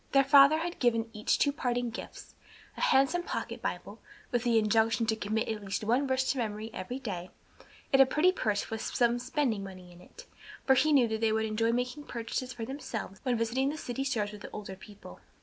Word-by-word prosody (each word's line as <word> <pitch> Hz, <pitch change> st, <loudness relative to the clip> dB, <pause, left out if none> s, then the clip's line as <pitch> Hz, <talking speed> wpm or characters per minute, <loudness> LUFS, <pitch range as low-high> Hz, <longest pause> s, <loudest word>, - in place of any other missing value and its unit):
Their 275 Hz, 0 st, +6 dB
father 280 Hz, +2 st, +7 dB
had 340 Hz, +2 st, -4 dB
given 230 Hz, -2 st, +1 dB
each 210 Hz, 0 st, +1 dB
two 285 Hz, -, +2 dB
parting 245 Hz, -3 st, -2 dB
gifts, -, -, -9 dB, 0.4 s
a -, -, -8 dB
handsome 275 Hz, +7 st, +3 dB
pocket -, -, -5 dB
Bible, -, -, -5 dB, 0.3 s
with 240 Hz, -1 st, 0 dB
the 235 Hz, -2 st, +3 dB
injunction 225 Hz, +1 st, +2 dB
to 220 Hz, 0 st, +1 dB
commit 220 Hz, +1 st, -2 dB
at 215 Hz, -2 st, -4 dB
least 195 Hz, +2 st, -3 dB
one 245 Hz, +6 st, +1 dB
verse 260 Hz, 0 st, +1 dB
to 275 Hz, -, -3 dB
memory 220 Hz, -1 st, -3 dB
every 190 Hz, +8 st, -5 dB
day, 190 Hz, -9 st, -5 dB, 0.6 s
and 270 Hz, -, +7 dB
a 270 Hz, -, +7 dB
pretty 310 Hz, +7 st, +3 dB
purse 210 Hz, -, -2 dB
with 225 Hz, 0 st, -3 dB
some 240 Hz, 0 st, +1 dB
spending 250 Hz, -5 st, -1 dB
money 185 Hz, -2 st, -10 dB
in 175 Hz, 0 st, -15 dB
it; -, -, -14 dB, 0.4 s
for 265 Hz, -, +6 dB
he 305 Hz, +4 st, +3 dB
knew 265 Hz, -5 st, +5 dB
they 220 Hz, 0 st, 0 dB
would 220 Hz, 0 st, +1 dB
enjoy 225 Hz, +1 st, 0 dB
making 250 Hz, +5 st, -2 dB
purchases 245 Hz, +2 st, -4 dB
for 235 Hz, -3 st, -6 dB
themselves 225 Hz, -7 st, -6 dB
when 250 Hz, -2 st, 0 dB
visiting 240 Hz, +4 st, 0 dB
the 305 Hz, -, -4 dB
city 265 Hz, -2 st, -4 dB
stores 215 Hz, -6 st, -1 dB
with 210 Hz, -1 st, -11 dB
the -, -, -8 dB
older 200 Hz, -2 st, -7 dB
people. 195 Hz, -, -13 dB
235 Hz, 210 wpm, -30 LUFS, 215-265 Hz, 0.6 s, father